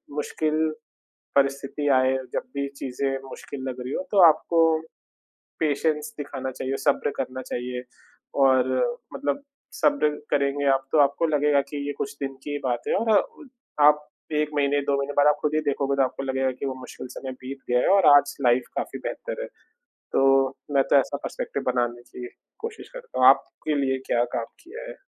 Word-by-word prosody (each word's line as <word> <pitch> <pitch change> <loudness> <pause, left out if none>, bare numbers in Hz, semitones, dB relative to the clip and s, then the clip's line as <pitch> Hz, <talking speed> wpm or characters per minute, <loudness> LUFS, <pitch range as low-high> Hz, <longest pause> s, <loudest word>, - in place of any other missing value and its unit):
मुश्किल 155 +1 -1 0.8
परिस्थिति 140 +1 +1
आए, 130 0 +3 0.2
जब - - 0
भी 140 0 0
चीज़ें 135 0 -2
मुश्किल 130 +1 -8
लग 125 0 -5
रही 125 +2 -5
हों - - -1
तो 200 -2 +4
आपको 165 +1 +2 1.0
पेशेंस 155 +4 0
दिखाना 135 -2 -4
चाहिए, 130 +1 -3
सब्र 145 -1 +1
करना 130 0 -4
चाहिए 125 0 -4 0.6
और 130 -1 +4 0.5
मतलब 285 0 -2 0.4
सब्र 150 0 +3 0.2
करेंगे 140 0 +1
आप 135 0 0
तो 155 - +4
आपको 140 +4 +2
लगेगा 150 -2 +3
कि 145 -1 -4
ये 145 - -2
कुछ 140 +1 -3
दिन 135 0 -3
की - - -5
ही 145 - -2
बात 120 -2 0
है - - +2
और 225 0 0
अ, - - +2 0.6
आप 150 0 +5 0.3
1 150 0 +1
महीने, 145 0 +2
2 140 0 +1
महीने 140 +1 -2
बाद 145 - +5
आप 150 0 +5
खुद 150 0 0
ही 155 - +3
देखोगे 140 -1 0
तो 135 - +4
आपको 130 +1 -2
लगेगा 135 0 0
कि 140 - -2
वो 130 - -2
मुश्किल 130 - -9
समय 130 -1 -6
बीत 135 +1 -6
गया 125 0 +4
है - - +2
और 195 - +4
आज 145 - +6
से 140 -1 -7
लाइफ़ 120 +1 +3
काफ़ी - - -3
बेहतर - - -4
है। - - -4 0.7
तो 135 0 +4 0.3
मैं 135 - +5
तो - - +6
ऐसा - - -3
पर्सपेक्टिव - - -4
बनाने 120 -1 -1
की 125 0 -9 0.3
कोशिश 450 0 -7
करता - - -8
हूँ, - - +8
आपके 155 -1 +2
लिए 130 0 0
क्या 120 0 +3
काम 115 - -1 0.2
किया 465 +8 -9
है? - - -8
140 Hz, 190 wpm, -25 LUFS, 130-150 Hz, 1.0 s, हूँ